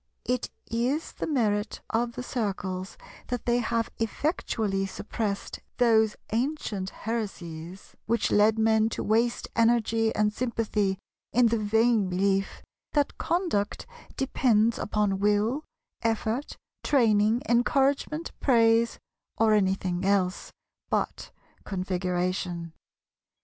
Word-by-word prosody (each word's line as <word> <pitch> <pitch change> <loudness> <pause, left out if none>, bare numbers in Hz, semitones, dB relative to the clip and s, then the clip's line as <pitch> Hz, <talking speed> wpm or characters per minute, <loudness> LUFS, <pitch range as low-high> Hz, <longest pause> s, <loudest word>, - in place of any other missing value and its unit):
It 250 0 -1 0.2
is 250 +7 -1
the - - -5
merit 215 -8 0
of 235 +1 0
the 250 - -5
Circles 195 -6 -3 0.3
that 245 -2 -3
they 240 0 +2
have 230 0 -1
effectually 220 - -1
suppressed 200 +1 -4 0.2
those 220 -3 +4 0.2
ancient 225 -6 -1
heresies 190 -6 -6
which 230 -1 +1
led 215 +2 +4
men 220 0 +3
to - - -2
waste 230 +3 +1
energy 230 -1 +3
and 210 0 +2
sympathy 215 -5 -1 0.4
in 240 -1 +5
the 230 0 +1
vain 220 -1 +2
belief 195 +1 0 0.3
that 290 -2 0
conduct 335 - -1 0.3
depends 235 -4 +2
upon 205 -2 0
will, 210 +8 +1 0.4
effort, 225 +3 -1 0.3
training, 225 -3 +3
encouragement, 275 +6 +1
praise, 230 -2 +3 0.4
or 220 0 +4
anything 190 -3 +1
else 190 -1 +1 0.4
but - - -1 0.3
Configuration. 180 -2 -2
220 Hz, 105 wpm, -27 LUFS, 200-235 Hz, 0.4 s, in